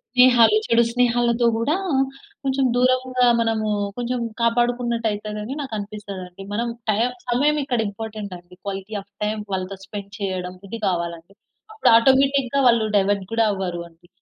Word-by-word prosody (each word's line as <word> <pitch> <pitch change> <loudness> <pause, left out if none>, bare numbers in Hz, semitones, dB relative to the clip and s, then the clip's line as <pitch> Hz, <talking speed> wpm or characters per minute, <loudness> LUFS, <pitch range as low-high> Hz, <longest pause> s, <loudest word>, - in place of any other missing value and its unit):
స్నేహాలు, 250 - +6
చెడు 235 0 +4
స్నేహాలతో 240 -1 +2
గూడా 275 +8 +1 0.7
కొంచెం 270 0 +1
దూరంగా 255 0 +2 0.2
మనము 225 -1 0 0.3
కొంచెం 245 +1 -2 0.2
కాపాడుకున్నట్టు 235 0 +1
అయితదని 210 +4 -5
నాకు 265 -5 -6
అనిపిస్తదండి. 200 -3 -8
మనం 235 +3 -1 0.2
టైమ్ 230 +4 +1 0.2
సమయం 290 +5 +2
ఇక్కడ 245 -4 -1
ఇంపార్టెంట్ 210 -2 -6
అండి. 175 +1 -18
క్వాలిటీ 200 +1 -5
ఆఫ్ 200 +1 -22
టైమ్ 215 0 -2
వాళ్ళతో 190 +1 -3
స్పెండ్ 200 -1 -8
చేయడం 185 -2 -3
ఇది 230 +3 -6
గావాలండి. 170 +1 -3 0.4
అప్పుడు 435 - +3
ఆటోమేటిక్‌గా 270 +1 +3
వాళ్ళు 230 -2 +4
డైవర్ట్ 200 0 +1
గూడా 225 0 +2
అవ్వరు 185 -3 -3
అండి. 170 +1 -25
225 Hz, 140 wpm, -22 LUFS, 195-245 Hz, 0.7 s, స్నేహాలు